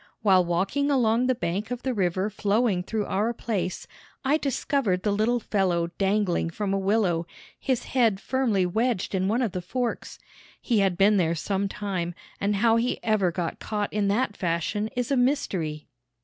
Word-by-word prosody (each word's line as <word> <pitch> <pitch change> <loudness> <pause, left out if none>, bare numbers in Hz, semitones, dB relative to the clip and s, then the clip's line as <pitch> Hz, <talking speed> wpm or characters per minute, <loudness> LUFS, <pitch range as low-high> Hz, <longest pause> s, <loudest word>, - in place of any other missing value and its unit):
While 190 -3 +5
walking 195 +12 0
along 245 -3 +2
the 255 - +2
bank 200 +1 -3
of 245 -1 -5
the 260 - 0
river 190 0 0
flowing 205 -1 +1
through 210 +3 -2
our 210 +5 0
place, 205 -6 -3 0.4
I 285 +3 +3
discovered 270 -9 0
the 210 - +1
little 220 +4 +1
fellow 180 -6 0
dangling 195 -4 +1
from 195 +3 -2
a 195 - +1
willow, 190 -4 +1 0.3
his 255 -2 -1
head 230 -7 +2
firmly 230 -6 +1
wedged 220 +3 0
in 190 0 +1
one 230 +5 +1
of 225 - -1
the 180 -1 -4
forks. 240 +6 -3 0.4
He 230 -4 +1
had 190 -3 +2
been 205 +2 +5
there 170 -2 +2
some 195 +4 -1
time, 185 -5 -3 0.2
and 205 +1 0
how 225 +3 +3
he 240 +2 0
ever 210 -5 +2
got 170 0 -3
caught 210 -1 -3
in 205 -1 +1
that 205 +1 0
fashion 175 +5 -1
is 245 +1 -2
a - - +3
mystery. 190 - 0
205 Hz, 175 wpm, -26 LUFS, 185-235 Hz, 0.4 s, While